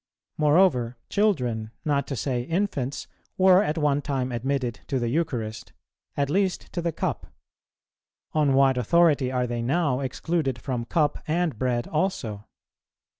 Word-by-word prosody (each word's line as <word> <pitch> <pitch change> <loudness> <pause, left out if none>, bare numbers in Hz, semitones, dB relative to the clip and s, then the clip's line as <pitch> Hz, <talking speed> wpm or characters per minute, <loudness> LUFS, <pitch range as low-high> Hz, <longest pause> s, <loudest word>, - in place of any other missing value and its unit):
Moreover, 150 -6 +3
children, 125 - 0 0.2
not 140 -2 +1
to 135 - -3
say 125 -1 -1
infants, 145 -3 -2 0.3
were 185 0 +6
at 160 -6 -1
one 145 -2 +2
time 135 -3 -2
admitted 125 0 -2
to 135 - -1
the 120 -2 -1
Eucharist, 120 -7 -3 0.4
at 140 -1 +1
least 190 +4 -1
to 175 - -2
the 170 0 -1
Cup; - - -3 1.1
on 150 -3 +3
what 135 -2 +4
authority 145 0 +3
are 125 -1 0
they 120 -1 -3
now 140 +1 +1
excluded 135 0 -2
from 120 +1 -3
Cup 150 +3 +1
and 160 -5 0
Bread 125 -2 0
also? 120 - -2
140 Hz, 140 wpm, -25 LUFS, 125-165 Hz, 1.1 s, were